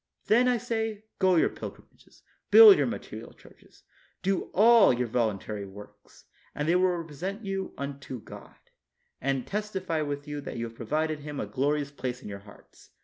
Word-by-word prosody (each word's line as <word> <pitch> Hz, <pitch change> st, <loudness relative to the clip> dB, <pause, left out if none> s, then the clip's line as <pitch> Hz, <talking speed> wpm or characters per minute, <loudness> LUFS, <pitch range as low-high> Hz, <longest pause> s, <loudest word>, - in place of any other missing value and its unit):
Then, 240 Hz, +4 st, +4 dB
I 250 Hz, -1 st, +3 dB
say, 225 Hz, -3 st, -3 dB, 0.2 s
go 185 Hz, -2 st, +4 dB
your 165 Hz, -, +4 dB
pilgrimages, -, -, -12 dB, 0.3 s
build 440 Hz, -3 st, +10 dB
your -, -, +1 dB
material -, -, -7 dB
churches, -, -, -21 dB, 0.4 s
do 195 Hz, 0 st, 0 dB
all 230 Hz, -, +6 dB
your 125 Hz, 0 st, -1 dB
voluntary 105 Hz, -3 st, -2 dB
works; 100 Hz, +2 st, -15 dB, 0.3 s
and 145 Hz, +1 st, -2 dB
they 170 Hz, -, +3 dB
will 185 Hz, +1 st, +4 dB
then 175 Hz, -, -2 dB
represent 185 Hz, +7 st, -6 dB
you 195 Hz, -1 st, -4 dB
unto 140 Hz, -2 st, -6 dB
God, -, -, -12 dB, 0.7 s
and 135 Hz, -1 st, -1 dB
testify 190 Hz, -6 st, -3 dB
with 145 Hz, 0 st, -4 dB
you 145 Hz, 0 st, -5 dB
that 140 Hz, -, -7 dB
you 115 Hz, -, -2 dB
have 115 Hz, 0 st, -9 dB
provided 155 Hz, +6 st, -2 dB
Him 145 Hz, -1 st, -7 dB
a -, -, -2 dB
glorious 145 Hz, +1 st, -1 dB
place 125 Hz, -2 st, -5 dB
in -, -, -7 dB
your 100 Hz, -1 st, -7 dB
hearts. 100 Hz, +1 st, -18 dB
150 Hz, 175 wpm, -28 LUFS, 125-195 Hz, 0.7 s, build